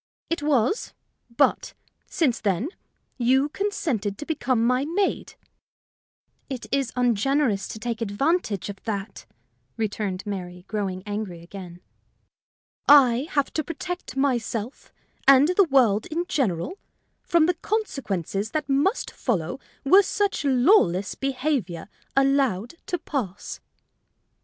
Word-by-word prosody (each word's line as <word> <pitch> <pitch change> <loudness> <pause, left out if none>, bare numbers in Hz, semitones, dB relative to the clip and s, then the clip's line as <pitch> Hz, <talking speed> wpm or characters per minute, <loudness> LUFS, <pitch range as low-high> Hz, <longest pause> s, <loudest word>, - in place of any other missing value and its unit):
"It 335 - 0
was; 290 - +1 0.4
but, 235 +4 +1 0.3
since 270 -8 0
then, 205 - 0 0.5
you 265 +4 +3
consented 285 - -2
to 295 - -7
become 255 -7 0
my 250 +2 +2
maid." 365 +6 -1 1.1
"It 260 -3 -5
is 275 -3 0
ungenerous 245 -2 +1
to - - -7
take 230 +1 -4
advantage 225 - 0
of 200 -1 -8
that," 200 -2 -5 0.5
returned 205 -3 -2
Mary, 180 -3 -6
growing 195 -4 -3
angry 205 -5 -5
again. 180 -1 -10 1.1
"I 270 -2 +6
have 285 -2 +1
to 310 - 0
protect 340 -1 -6
myself 245 -3 -1 0.4
and 275 +3 +7
the 370 +2 +4
world 235 -7 +3
in 340 +3 -2
general 260 - -1 0.4
from 335 -2 +3
the 355 - +2
consequences 220 - -2
that 305 -1 -1
must 285 - +1
follow 180 - -2 0.2
were 375 +9 +7
such 405 -1 -1
lawless 250 - +3
behavior 260 - -2 0.3
allowed 270 - +2
to 355 - -1
pass." 250 - -4
250 Hz, 115 wpm, -25 LUFS, 205-295 Hz, 1.1 s, and